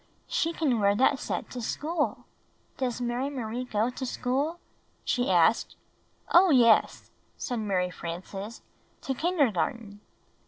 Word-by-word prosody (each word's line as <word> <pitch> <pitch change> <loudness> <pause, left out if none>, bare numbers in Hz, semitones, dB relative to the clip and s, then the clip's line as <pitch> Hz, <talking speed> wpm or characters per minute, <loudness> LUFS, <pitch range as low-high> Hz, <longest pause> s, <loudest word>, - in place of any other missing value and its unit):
"She 480 -10 0
can 290 -8 0
wear 200 0 +3
that 265 +4 +3
set - - -4
to 250 - -5
school 305 +7 -2 0.2
— - - -39
does 250 -2 -1
Mary 245 +3 -1
Marie 250 -2 -4
go 225 0 0
to 255 - -7
school? 270 +6 -1 0.2
" - - -40
she 245 -3 0
asked. 180 +5 +3 0.6
"Oh, 360 +2 +7
yes," 235 -6 +4 0.3
said 245 -2 -3
Mary 185 -4 0
Frances; 190 +6 -7 0.4
"to 270 - -2
kindergarten." 230 - 0
245 Hz, 140 wpm, -28 LUFS, 210-275 Hz, 0.6 s, Oh